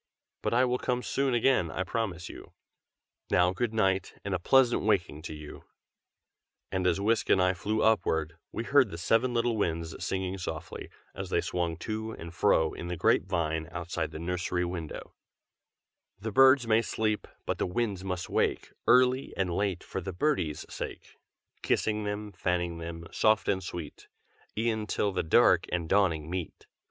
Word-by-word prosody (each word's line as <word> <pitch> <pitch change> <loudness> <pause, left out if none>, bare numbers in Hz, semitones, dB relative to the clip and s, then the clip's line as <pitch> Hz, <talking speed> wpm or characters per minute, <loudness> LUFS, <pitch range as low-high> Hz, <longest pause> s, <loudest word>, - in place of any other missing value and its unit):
But - - 0
I 125 +2 +5
will 125 0 0
come 125 -1 -1
soon 135 -2 0
again, 120 -8 +3
I 90 - -2
promise 95 -3 -3
you. - - -11 0.8
Now 90 +2 +3
good 115 +4 -1
night, 95 -4 +1
and 100 - -2
a 90 - 0
pleasant 125 +5 +4
waking 95 -7 0
to 80 - -6
you!" 75 -1 -10 1.1
and 95 -1 0
as 90 +1 +2
Whisk 110 +3 +1
and - - +5
I 90 0 +3
flew 105 +4 -1
upward, 85 -7 +2 0.2
we 115 - -3
heard 130 -1 +4
the 85 - -7
seven 115 +8 +2
little 115 0 +1
Winds 85 -5 -2
singing 95 0 -2
softly, 80 -2 -6 0.2
as - - -6
they - - +2
swung 85 -2 -2
to 110 +2 -4
and 85 0 -9
fro 80 -1 +3
in 85 - -6
the 90 0 -3
grape 90 - +3
vine 80 -3 -1
outside 85 -2 -3
the 80 - -8
nursery 90 +1 -1
window: 85 -3 -6 1.0
The 110 +3 -5
birds 135 +2 +6
may 110 0 +4
sleep, 110 -2 -1 0.2
but - - -2
the - - 0
winds 100 -1 -2
must 90 -2 -3
wake - - 0
Early 130 +1 +4
and 95 -3 0
late, 95 -1 -1
for 95 - -5
the 95 +1 -5
birdies' 90 - 0
sake; - - -7 0.5
Kissing 105 -1 0
them, 105 0 -4
fanning 90 -2 -1
them, 85 0 -6
soft 110 -2 +3
and 95 -1 +1
sweet, 85 -3 -7 0.5
E'en 110 -1 0
till 105 - 0
the - - 0
dark 80 - +4
and 90 -1 0
the 80 - -9
dawning 85 -7 +2
meet. 90 -2 -5
95 Hz, 175 wpm, -29 LUFS, 85-110 Hz, 1.1 s, birds